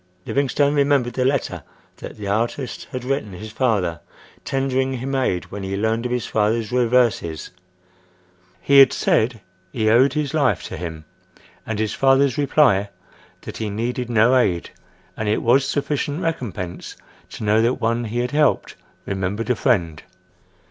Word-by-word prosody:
— 90 - -39
Livingstone 140 +1 +1
remembered 140 -4 +2
the 125 - 0
letter 135 0 -1 0.4
that - - -9
the 105 - -7
artist 115 +6 -2
had 130 -1 -5
written 130 -6 -2
his 105 +4 -8
father, 105 - 0 0.4
tendering 135 -1 -1
him 130 +2 -4
aid 125 -10 0
when 100 - -6
he 95 0 -3
learned 110 +3 0
of - - -7
his 125 -3 -1
father's 110 +1 0
reverses—he 90 - -1
had 135 -2 +8
said 115 -1 +1 0.3
he 110 -2 +1
owed 130 +4 +4
his 150 -1 -2
life 125 - +1
to - - -6
him—and 85 +5 -9
his 110 0 -1
father's 135 -1 +3
reply, 135 -9 +3 0.5
that - - -8
he 110 - -3
needed 120 +4 -3
no 115 +2 +4
aid, 90 -9 +1 0.4
and 110 -1 -2
it 105 - 0
was 130 +3 +3
sufficient 145 +1 -2
recompense 110 - -4 0.3
to - - -8
know 105 +1 +3
that 120 +3 +2
one 115 +1 -1
he 115 +2 -4
had 125 +1 -3
helped 150 -1 +1 0.3
remembered 100 +4 -2
a - - +2
friend. 85 - 0
115 Hz, 155 wpm, -21 LUFS, 100-130 Hz, 0.5 s, had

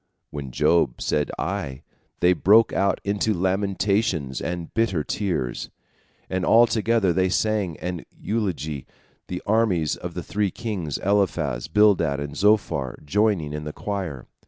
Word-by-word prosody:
And - - -12
when 70 -3 -5
Job 70 -1 +2
said 75 -1 0
Aye, 80 -6 -3 0.4
they 90 +1 +5
broke 105 +5 +5
out 100 +1 +1
into 100 +1 0
lamentations 95 - 0
and 85 -1 -4
bitter 105 -9 +1
tears, 80 - -2 0.6
and 95 0 -2
all 115 +5 +6
together 115 -4 +1
they 95 +1 +2
sang 100 -4 0
an 90 -2 -5 0.2
elegy, 85 - -2 0.4
the 90 - -5
armies 100 -8 +2
of - - -7
the - - -4
three 105 -1 -1
kings, 95 -10 -4
Eliphaz, 95 -11 0
Bildad, 85 -7 +3
and 70 0 -5
Zophar, 90 -10 +1
joining 95 -3 +1
in 75 0 -4
the 75 0 -6
choir. 95 -11 -4
95 Hz, 140 wpm, -24 LUFS, 75-105 Hz, 0.6 s, all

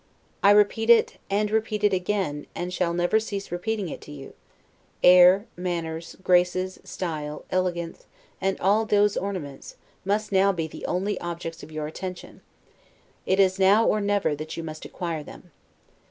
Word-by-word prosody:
I 200 - +6
repeat 210 +2 +4
it, 235 -1 +5
and 205 +1 0
repeat 215 -1 -1
it 205 -1 +4
again, 180 -6 -2
and 180 +1 -4
shall 180 -2 0
never 175 +5 +2
cease 200 -4 -5
repeating 195 +3 -2
it - - -7
to - - -12
you: 140 -2 -10 0.7
air, 180 +3 +7
manners, 170 -2 -4
graces, 180 +1 +2
style, 150 -4 -5
elegance, 175 -2 -2 0.3
and 195 0 0
all 210 +4 +2
those 205 -1 +3
ornaments, 180 -9 -5 0.3
must 210 +2 -1
now 195 +1 +4
be 170 -4 -3
the 160 - -7
only 195 +3 -1
objects 170 -1 -6
of 155 - -12
your 155 -1 -4
attention; 180 +4 -8 0.9
it 190 - +2
is 190 0 +3
now, 200 +4 +5
or 215 - +2
never, 200 -5 +1
that 155 +2 -6
you 165 - -4
must 155 -1 -8
acquire 170 -3 -4
them. 175 +3 -13
185 Hz, 160 wpm, -25 LUFS, 170-205 Hz, 0.9 s, air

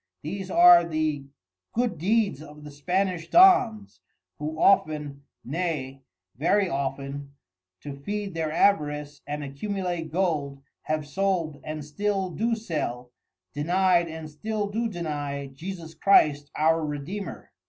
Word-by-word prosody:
These 190 +5 -5
are 175 -1 +8
the 155 -4 -1 0.5
good 235 -8 -1
Deeds 205 -3 +1
of 150 -1 -12
the 150 - -9
Spanish 175 +3 -1
Dons, 250 - +5 0.4
who 155 +1 -4
often, 150 -7 +2 0.2
nay 140 -3 -3 0.3
very 190 - +2
often 140 -1 -4 0.5
to 145 - -6
feed 200 +7 -4
their 160 -2 -2
Avarice, 150 -5 +1
and 145 0 -4
accumulate 175 +2 -4
Gold 150 -6 -1 0.2
have 155 -1 -1
sold 170 -2 -1
and 155 -1 -5
still 195 +4 -1
do 230 +6 0
sell, 135 - -4 0.4
denied 175 +3 +2
and 160 -1 -7
still 205 +7 -3
do 230 +3 -1
deny 145 -6 -4
Jesus 165 +1 -7
Christ 145 -8 +4
our 160 +1 +2
Redeemer. 155 +6 -5
160 Hz, 120 wpm, -26 LUFS, 145-195 Hz, 0.5 s, are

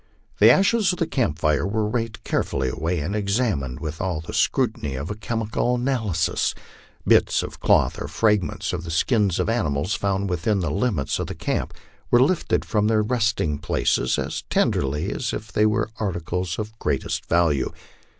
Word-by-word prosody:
The - - +8
ashes 200 +1 +4
of 180 - -4
the 165 - +1
camp 115 - -1
fires 75 +2 +1
were 110 +1 0
raked 115 0 -3
carefully 65 -1 -1
away 80 +5 -2
and 90 +8 -3
examined 100 - -1
with 80 0 -5
all 90 -4 -1
the 80 - -8
scrutiny 110 - 0
of 70 +9 -4
a - - -3
chemical 115 +2 -1
analy 120 - -1
sis. 80 - 0 0.5
Bits - - +4
of - - -8
cloth - - +2
or - - -3
fragments 105 -7 0
of 85 - -3
the 85 - -7
skins 100 +2 +2
of - - 0
animals 90 -6 0
found 100 0 -1
within 95 +3 0
the 85 -5 -1
limits 90 - 0
of - - -2
the - - -6
camp - - -2 0.3
were 120 - +5
lifted 155 +7 +2
from 105 -2 +1
their 110 -1 +3
resting 105 - 0
places 65 - +1
as - - -3
tenderly 75 +8 0
as 120 - -3
if 110 0 -6
they 105 +1 +3
were 110 0 0
articles 90 -3 -2
of 110 +1 -6
greatest - - -2
value. 80 -5 +2
100 Hz, 180 wpm, -23 LUFS, 80-115 Hz, 0.5 s, The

